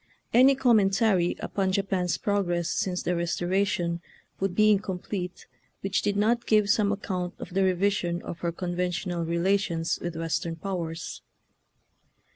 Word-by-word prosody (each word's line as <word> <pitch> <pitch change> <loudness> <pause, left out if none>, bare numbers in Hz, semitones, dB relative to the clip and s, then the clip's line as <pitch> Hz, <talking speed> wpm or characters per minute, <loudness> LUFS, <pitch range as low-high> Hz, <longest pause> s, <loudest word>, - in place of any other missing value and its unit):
Any 260 +3 +7
commentary 205 -7 +3
upon 190 -2 -1
Japan's 190 -3 0
prog 205 -2 0
ress 175 -1 -1
since 180 -2 -1
the - - 0
Eestoration 175 0 0 0.4
would 190 -2 -1
be 215 +1 +5
in 205 - +4
complete 185 -2 -5 0.4
which 195 0 0
did 205 -1 0
not 235 +3 +1
give 210 -2 +4
some 205 -1 +2
ac 205 0 -3
count 180 -3 -3
of - - -9
the 195 +1 +2
revision 185 -2 +1
of 170 - -7
her 170 0 -1
conventional 180 0 -2
relations 170 0 0
with. 175 -1 -4
Western 165 0 -2
powers. 165 -2 -5
185 Hz, 145 wpm, -27 LUFS, 175-200 Hz, 0.4 s, Any